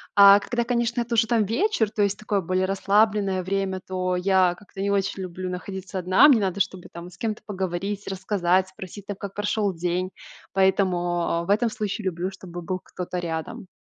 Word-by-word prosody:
А 200 Hz, 0 st, +9 dB
когда, 240 Hz, +3 st, -2 dB
конечно, 235 Hz, 0 st, 0 dB
это 235 Hz, 0 st, -2 dB
уже 225 Hz, 0 st, +3 dB
там 225 Hz, -1 st, +3 dB
вечер, 230 Hz, -, +1 dB
то 210 Hz, -1 st, 0 dB
есть 200 Hz, 0 st, 0 dB
такое 210 Hz, -1 st, -1 dB
более 185 Hz, +1 st, 0 dB
расслабленное 195 Hz, 0 st, +2 dB
время, 190 Hz, 0 st, -2 dB
то 185 Hz, -1 st, -1 dB
я 185 Hz, -1 st, +3 dB
как-то 200 Hz, -1 st, -14 dB
не 200 Hz, 0 st, 0 dB
очень 195 Hz, -1 st, -1 dB
люблю 185 Hz, 0 st, -5 dB
находиться 190 Hz, +1 st, -5 dB
одна, 185 Hz, -, +6 dB
мне 255 Hz, -6 st, +6 dB
надо, 195 Hz, -1 st, -1 dB
чтобы, 190 Hz, -2 st, -2 dB
там, 170 Hz, +1 st, -9 dB
с 180 Hz, -, -17 dB
кем-то 215 Hz, +1 st, -3 dB
поговорить, 195 Hz, +1 st, -3 dB
рассказать, 190 Hz, -1 st, +1 dB
спросить, 190 Hz, +1 st, -10 dB
там, 205 Hz, -2 st, -5 dB
как 200 Hz, -1 st, -7 dB
прошёл 205 Hz, -1 st, 0 dB
день. 180 Hz, +2 st, -1 dB, 0.4 s
Поэтому, 190 Hz, -1 st, +3 dB, 0.3 s
а, 170 Hz, 0 st, 0 dB
в 170 Hz, -, -10 dB
этом 220 Hz, +4 st, +3 dB
случае 215 Hz, -1 st, -4 dB
люблю, 185 Hz, +1 st, -2 dB
чтобы 180 Hz, -2 st, -9 dB
был 185 Hz, +2 st, -3 dB
кто-то 180 Hz, 0 st, -6 dB
рядом. 165 Hz, +2 st, -5 dB
190 Hz, 190 wpm, -24 LUFS, 185-205 Hz, 0.4 s, А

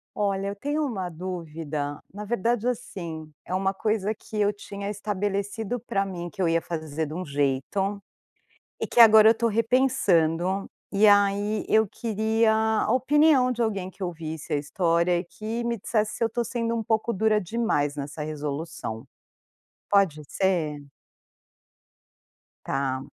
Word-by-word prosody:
Olha, 200 Hz, -1 st, 0 dB
eu 200 Hz, -, -3 dB
tenho 290 Hz, +8 st, -1 dB
uma 195 Hz, -9 st, -3 dB
dúvida, 160 Hz, -4 st, -5 dB
na 210 Hz, +1 st, -6 dB
verdade, 235 Hz, +2 st, 0 dB
assim 165 Hz, -10 st, -5 dB
é 180 Hz, -, -5 dB
uma 195 Hz, +1 st, +1 dB
coisa 215 Hz, +1 st, 0 dB
que 215 Hz, 0 st, -7 dB
eu 205 Hz, 0 st, +3 dB
tinha 200 Hz, 0 st, -7 dB
estabelecido 205 Hz, +2 st, -2 dB
para 200 Hz, -3 st, -1 dB
mim, 175 Hz, -3 st, -5 dB
que 195 Hz, -, -7 dB
eu 180 Hz, -, +3 dB
ia 165 Hz, 0 st, +2 dB
fazer 160 Hz, -2 st, -3 dB
de 150 Hz, -, -7 dB
um 180 Hz, +3 st, -3 dB
jeito 145 Hz, +9 st, -1 dB, 0.8 s
e -, -, -2 dB
que -, -, 0 dB
agora 220 Hz, -1 st, +9 dB
eu -, -, +8 dB
estou 230 Hz, +1 st, +1 dB
repensando, 200 Hz, -7 st, +2 dB, 0.2 s
e 210 Hz, +1 st, +5 dB
aí 205 Hz, +1 st, +3 dB
eu 220 Hz, 0 st, +4 dB
queria 220 Hz, +1 st, +1 dB
a 220 Hz, 0 st, +1 dB
opinião 265 Hz, 0 st, +4 dB
de 240 Hz, -1 st, -2 dB
alguém 200 Hz, -5 st, -1 dB
que 190 Hz, +1 st, -9 dB
ouvisse 160 Hz, -4 st, -5 dB
a -, -, +3 dB
história 170 Hz, +4 st, +1 dB
e -, -, -4 dB
que 215 Hz, +7 st, -5 dB
me 235 Hz, 0 st, -1 dB
dissesse 215 Hz, +1 st, 0 dB
se -, -, 0 dB
eu -, -, +4 dB
estou 235 Hz, +2 st, -2 dB
sendo 230 Hz, 0 st, -2 dB
um 225 Hz, -, -2 dB
pouco 220 Hz, +1 st, 0 dB
dura 215 Hz, +2 st, +2 dB
demais 175 Hz, -8 st, 0 dB
nessa 145 Hz, +1 st, -5 dB
resolução, 150 Hz, -6 st, -5 dB, 0.9 s
pode 190 Hz, -7 st, +3 dB
ser? 160 Hz, -6 st, 0 dB, 1.8 s
Tá, 135 Hz, -1 st, -1 dB
200 Hz, 155 wpm, -26 LUFS, 165-220 Hz, 1.8 s, agora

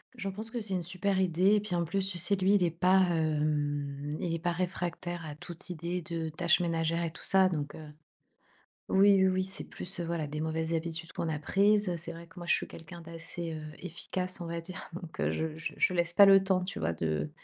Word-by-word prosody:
J'en 200 Hz, -5 st, -4 dB
pense 215 Hz, +4 st, -6 dB
que 240 Hz, -, -3 dB
c'est 200 Hz, -3 st, -2 dB
une 180 Hz, -, -1 dB
super 190 Hz, +3 st, 0 dB
idée 185 Hz, +2 st, +4 dB
et -, -, +4 dB
puis, 205 Hz, -3 st, -3 dB
en 170 Hz, -, +1 dB
plus, 195 Hz, +4 st, +1 dB
tu 185 Hz, -, -3 dB
sais, 190 Hz, +4 st, +4 dB
lui, 190 Hz, +1 st, +3 dB
il 200 Hz, -3 st, +4 dB
est 175 Hz, -, +3 dB
pas, 180 Hz, +3 st, +4 dB
hem, 150 Hz, -3 st, -1 dB
il 170 Hz, -, -2 dB
est 165 Hz, -, -1 dB
pas 175 Hz, +2 st, 0 dB
réfractaire 175 Hz, -1 st, -3 dB
à 150 Hz, -2 st, -6 dB
toute 170 Hz, +3 st, -8 dB
idée 175 Hz, +2 st, -3 dB
de 165 Hz, -1 st, -3 dB
tâches 170 Hz, +2 st, +2 dB
ménagères 165 Hz, -1 st, 0 dB
et 165 Hz, -, -2 dB
tout 160 Hz, -, -12 dB
ça. 190 Hz, -1 st, +4 dB
Donc, 145 Hz, -4 st, -3 dB
heu 155 Hz, -1 st, -10 dB, 1.0 s
oui, 200 Hz, +1 st, +6 dB
oui, 190 Hz, -, +5 dB
oui, 185 Hz, 0 st, +1 dB
c'est 190 Hz, -, -2 dB
plus, 180 Hz, 0 st, -4 dB
heu, -, -, -1 dB
voilà, 165 Hz, -2 st, -2 dB
des 150 Hz, +1 st, -5 dB
mauvaises 160 Hz, +1 st, -1 dB
habitudes 165 Hz, 0 st, -3 dB
qu'on 165 Hz, -, -2 dB
a 155 Hz, -, -1 dB
prises, 200 Hz, +6 st, +3 dB
heu, 175 Hz, -, -1 dB
c'est 170 Hz, 0 st, -4 dB
vrai 170 Hz, 0 st, -10 dB
que, 175 Hz, -, -15 dB
moi, 175 Hz, -, -7 dB
je -, -, +4 dB
suis -, -, -2 dB
quelqu'un 165 Hz, +1 st, -10 dB
d'assez, 165 Hz, 0 st, -5 dB
heu, 155 Hz, -, -6 dB, 0.2 s
efficace, 180 Hz, +2 st, -4 dB
on 170 Hz, -, -4 dB
va 170 Hz, 0 st, -3 dB
dire. 185 Hz, +2 st, -8 dB
Donc, 170 Hz, -2 st, -8 dB
heu, -, -, +1 dB
je 160 Hz, -1 st, -2 dB
je 160 Hz, -, -5 dB
je 185 Hz, -, +2 dB
laisse 170 Hz, -1 st, +1 dB
pas 200 Hz, -, +9 dB
le 195 Hz, -1 st, +8 dB
temps, 190 Hz, -1 st, +2 dB
tu 185 Hz, -, -5 dB
vois, 80 Hz, +1 st, 0 dB
de 75 Hz, -2 st, -1 dB
170 Hz, 250 wpm, -30 LUFS, 160-185 Hz, 1.0 s, pas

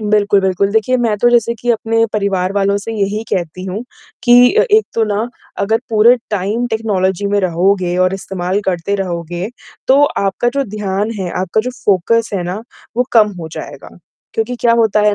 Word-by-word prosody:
बिल्कुल, 205 Hz, -1 st, +2 dB
बिल्कुल, 190 Hz, +1 st, +1 dB
देखिए 225 Hz, +4 st, +2 dB
मैं 230 Hz, -4 st, 0 dB
तो 240 Hz, -, +4 dB
जैसे 235 Hz, -1 st, +2 dB
कि 240 Hz, +1 st, -2 dB
अपने 225 Hz, 0 st, +1 dB
परिवार 195 Hz, -3 st, 0 dB
वालों 200 Hz, 0 st, +1 dB
से 225 Hz, +3 st, -6 dB
यही 210 Hz, 0 st, -1 dB
कहती 180 Hz, +1 st, -2 dB
हूँ 195 Hz, +5 st, -5 dB, 0.4 s
कि 245 Hz, 0 st, +6 dB
अ, 445 Hz, -, +5 dB
एक 430 Hz, +1 st, +4 dB
तो 230 Hz, -, +2 dB
ना 215 Hz, +2 st, -1 dB, 0.3 s
अगर 220 Hz, +3 st, +1 dB
पूरे 225 Hz, +2 st, +6 dB, 0.2 s
टाइम, 210 Hz, +4 st, -1 dB
टेक्नोलॉजी 205 Hz, -4 st, -1 dB
में 205 Hz, 0 st, +1 dB
रहोगे 180 Hz, 0 st, +1 dB
और 185 Hz, +1 st, +1 dB
इस्तेमाल 190 Hz, 0 st, -3 dB
करते 185 Hz, +1 st, -1 dB
रहोगे, 175 Hz, -1 st, -3 dB, 0.4 s
तो 275 Hz, +2 st, +5 dB
आपका 200 Hz, -3 st, 0 dB
जो 280 Hz, -, +1 dB
ध्यान 205 Hz, +1 st, -1 dB
है, 180 Hz, -, -3 dB
आपका 190 Hz, +4 st, 0 dB
जो 250 Hz, +3 st, -4 dB
फोकस 215 Hz, +4 st, +2 dB
है 185 Hz, -, -1 dB
ना, 185 Hz, +5 st, -4 dB, 0.3 s
वो 250 Hz, -, +3 dB
कम 215 Hz, -3 st, +4 dB
हो 160 Hz, -, -6 dB
जाएगा। -, -, -8 dB, 0.5 s
क्योंकि 445 Hz, -, -1 dB
क्या 235 Hz, -, +4 dB
होता 225 Hz, -2 st, +3 dB
है 210 Hz, 0 st, +3 dB
205 Hz, 185 wpm, -16 LUFS, 190-225 Hz, 0.5 s, कि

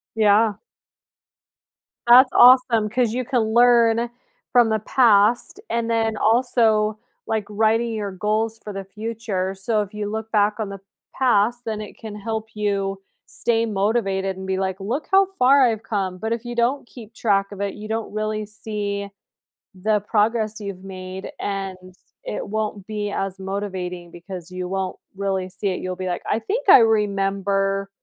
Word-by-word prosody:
Yeah. 215 Hz, 0 st, +3 dB, 1.5 s
That's 255 Hz, +2 st, +8 dB
awesome, 245 Hz, -4 st, +6 dB
'cause 235 Hz, 0 st, 0 dB
you 255 Hz, -1 st, -2 dB
can 245 Hz, -3 st, +1 dB
learn 235 Hz, -1 st, +4 dB, 0.4 s
from 240 Hz, -3 st, +5 dB
the 220 Hz, 0 st, +1 dB
past 230 Hz, -, +3 dB
and 230 Hz, 0 st, -1 dB
then, 225 Hz, -1 st, 0 dB
also, 220 Hz, -2 st, +2 dB, 0.3 s
like, 220 Hz, -2 st, -1 dB
writing 225 Hz, +2 st, +1 dB
your 205 Hz, -2 st, -3 dB
goals 215 Hz, +4 st, -1 dB
for 210 Hz, -, -7 dB
the 195 Hz, 0 st, -5 dB
future, 210 Hz, -2 st, -4 dB
so 210 Hz, +3 st, 0 dB
if 205 Hz, +1 st, -6 dB
you 210 Hz, -1 st, -4 dB
look 220 Hz, +1 st, -5 dB
back 210 Hz, 0 st, +2 dB
on 210 Hz, -2 st, -2 dB
the 195 Hz, -1 st, -7 dB, 0.3 s
past, 240 Hz, -1 st, +2 dB
then 215 Hz, -1 st, -3 dB
it 210 Hz, -, -8 dB
can 215 Hz, -2 st, -9 dB
help 220 Hz, +1 st, -4 dB
you 195 Hz, -2 st, -1 dB, 0.3 s
stay 230 Hz, -1 st, 0 dB
motivated 195 Hz, -2 st, -1 dB
and 190 Hz, 0 st, -7 dB
be 190 Hz, 0 st, -1 dB
like, 190 Hz, 0 st, -2 dB
"Look 240 Hz, +10 st, -3 dB
how 390 Hz, 0 st, +6 dB
far 270 Hz, +2 st, +5 dB
I've 225 Hz, -3 st, +1 dB
come." 190 Hz, -4 st, -2 dB
But, 220 Hz, +4 st, -2 dB
if 235 Hz, +1 st, -5 dB
you 240 Hz, 0 st, -5 dB
don't 240 Hz, +2 st, 0 dB
keep 230 Hz, -3 st, -12 dB
track 200 Hz, -3 st, +1 dB
of 200 Hz, 0 st, -7 dB
it, 200 Hz, -1 st, -2 dB
you 215 Hz, +1 st, -8 dB
don't 220 Hz, -1 st, -3 dB
really 215 Hz, 0 st, -2 dB
see 205 Hz, -1 st, -4 dB, 0.6 s
the 210 Hz, +3 st, 0 dB
progress 215 Hz, +1 st, 0 dB
you've 195 Hz, -2 st, -7 dB
made 185 Hz, 0 st, -7 dB
and 195 Hz, -2 st, -3 dB, 0.5 s
it -, -, -4 dB
won't 210 Hz, -2 st, -3 dB
be 210 Hz, -1 st, -3 dB
as 195 Hz, -1 st, -3 dB
motivating 185 Hz, -3 st, -5 dB
because 175 Hz, 0 st, -9 dB
you 180 Hz, 0 st, -4 dB
won't 190 Hz, -1 st, -3 dB, 0.2 s
really 190 Hz, -2 st, -2 dB
see 190 Hz, +2 st, -3 dB
it, 185 Hz, -, -2 dB
you'll 185 Hz, 0 st, -4 dB
be 185 Hz, 0 st, -5 dB
like, 180 Hz, -, -3 dB
"I 215 Hz, -, +2 dB
think 405 Hz, -, -3 dB
I -, -, +10 dB
remember 195 Hz, -2 st, +1 dB
210 Hz, 165 wpm, -22 LUFS, 195-225 Hz, 1.5 s, I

